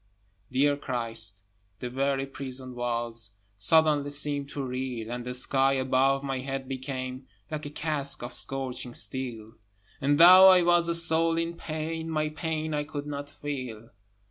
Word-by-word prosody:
Dear 140 +2 +2
Christ! 115 -7 -3 0.4
the 125 - -4
very 135 +2 -1
prison 130 -1 -7
walls 115 -3 -4 0.2
Suddenly 150 +6 +3
seemed 145 -1 -1
to 140 -1 -5
reel, 125 -3 -4
And 120 0 -4
the 125 0 -2
sky 135 +1 +3
above 135 +1 +1
my 135 -2 -3
head 135 0 -5
became 130 0 -5 0.2
Like 155 -1 -4
a - - -6
casque 150 -3 0
of 120 - -6
scorching 130 -2 -3
steel; 115 -4 -3 0.4
And, 145 +2 +2
though 185 +3 +10
I 185 -1 +6
was 170 0 +3
a 170 - +5
soul 165 0 +4
in 165 0 -2
pain, 160 0 -5
My 155 -1 -1
pain 160 0 -3
I 150 0 -1
could 145 0 -6
not 145 -1 -6
feel. 130 -7 -7
135 Hz, 155 wpm, -27 LUFS, 125-155 Hz, 0.4 s, though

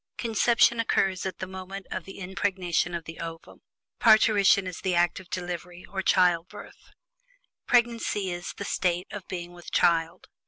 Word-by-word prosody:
Conception 235 +1 +3
occurs 195 -4 +1
at 185 - -6
the 185 - -4
moment 190 +1 -8
of - - -4
the 195 - -10
impregnation 185 -2 -1
of 170 - -4
the 165 +1 -10
ovum; 165 0 -8 0.4
parturition 210 -3 +5
is 185 -2 -6
the 185 -2 -1
act 175 0 +2
of 185 -1 -14
delivery, 180 0 -6
or 190 0 -4
childbirth. 180 -2 0 0.8
Pregnancy 230 -5 +1
is 175 0 -5
"the 200 - -5
state 180 -2 0
of 205 -3 -8
being 175 -1 -6
with 175 -1 -11
child." 165 -1 +1
185 Hz, 155 wpm, -27 LUFS, 175-200 Hz, 0.8 s, parturition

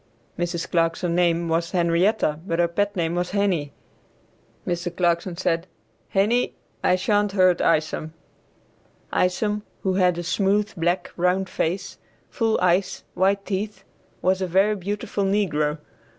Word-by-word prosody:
Mrs. 175 -1 -2
Clarkson's 170 +1 0
name 170 -1 +2
was 165 +1 0
Henrietta, 170 -1 +2
but 165 - 0
her 170 0 +3
pet 205 +4 -1
name 170 -2 0
was 175 +1 -2
Henie. 185 -8 0 0.9
Mr. 175 0 -3
Clarkson 170 0 +1
said. 170 -1 0 0.5
"Henie, 220 +6 +2 0.3
I 180 - +4
shan't 205 +1 +1
hurt 185 -3 +4
Isom." 155 -1 +1 1.0
Isom, 210 +3 +1 0.2
who 190 - +1
had 180 -2 +3
a 175 - -3
smooth, 200 +4 +1
black, 175 +1 -1
round 180 +1 +1
face, 190 +4 -2 0.3
full 225 -4 +1
eyes, 185 +1 +1
white 195 +1 +1
teeth, 200 0 -3 0.4
was 185 +1 +2
a 185 - 0
very 195 +4 +3
beautiful 205 +2 -3
negro. 165 -7 +1
180 Hz, 135 wpm, -24 LUFS, 170-200 Hz, 1.0 s, I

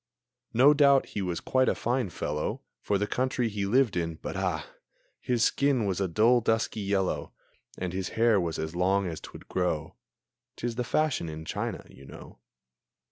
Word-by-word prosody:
No 135 +5 +7
doubt 140 -2 +5
he 100 - -3
was 90 -3 -2
quite 130 0 +2
a - - +1
fine 120 -3 -1
fellow 75 -2 -3 0.2
For 100 - +1
the 105 - 0
country 125 +1 0
he 100 -2 -2
lived 120 0 +3
in 85 -2 -1
but, - - -6
ah! - - -1 0.5
His 120 -2 0
skin 140 -5 +2
was 95 -1 -1
a 95 - +1
dull, 115 +8 +4
dusky 110 0 0
yellow, 95 -2 -1 0.4
And 90 -1 -3
his 95 0 -3
hair 115 -3 +4
was 85 -2 -2
as 80 +2 -4
long 95 +2 +2
as 85 -3 -5
'twould - - -11
grow. 80 -4 -1 0.6
('Tis 120 0 -3
the 125 +2 -2
fashion 145 - 0
in 80 0 -7
China, - - -4
you 70 - -15
know.) - - -12
100 Hz, 180 wpm, -28 LUFS, 90-125 Hz, 0.6 s, No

